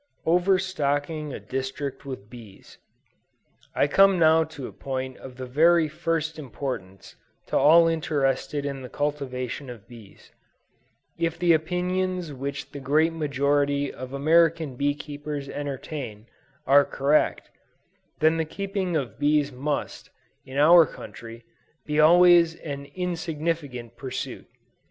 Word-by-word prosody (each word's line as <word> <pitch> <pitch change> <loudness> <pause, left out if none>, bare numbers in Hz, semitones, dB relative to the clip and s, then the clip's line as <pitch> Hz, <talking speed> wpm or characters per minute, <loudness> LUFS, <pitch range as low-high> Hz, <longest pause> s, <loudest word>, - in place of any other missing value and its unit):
OVERSTOCKING 160 -4 0
A - - -6
DISTRICT 135 +2 -5
WITH 130 -7 -7
BEES. 110 -4 -14 1.0
I - - +3
come 195 +6 +5
now 160 -1 +5
to 155 -4 -8
a - - -7
point 130 -1 -5
of 130 -1 -11
the 130 - -5
very 160 +5 +4
first 160 0 -2
importance 120 -8 -7 0.3
to - - -4
all 165 +3 +6
interested 145 -3 -1
in 140 -1 -4
the 125 - -8
cultivation 140 -2 -3
of 115 -5 -11
bees. 115 -5 -15 0.9
If 165 -1 -1
the 175 -1 +4
opinions 180 +1 -1
which 140 +2 -6
the 145 - -7
great 155 +4 +2
majority 145 -2 0
of 130 0 -8
American 160 0 +2
bee 145 +2 0
keepers 145 -1 -6
entertain, 135 -6 -6 0.4
are 140 +2 +6
correct, 145 +3 0 0.7
then 160 +1 +4
the 160 - 0
keeping 195 +1 -3
of 135 -5 -5
bees 145 -1 +2
must, 140 +3 -4 0.3
in 130 +1 -8
our 160 +2 +7
country, 115 0 -11 0.4
be 150 0 -1
always 170 +1 +6
an 140 -2 -6
insignificant 160 -8 -3
pursuit. 130 +2 -6
145 Hz, 125 wpm, -25 LUFS, 135-165 Hz, 1.0 s, our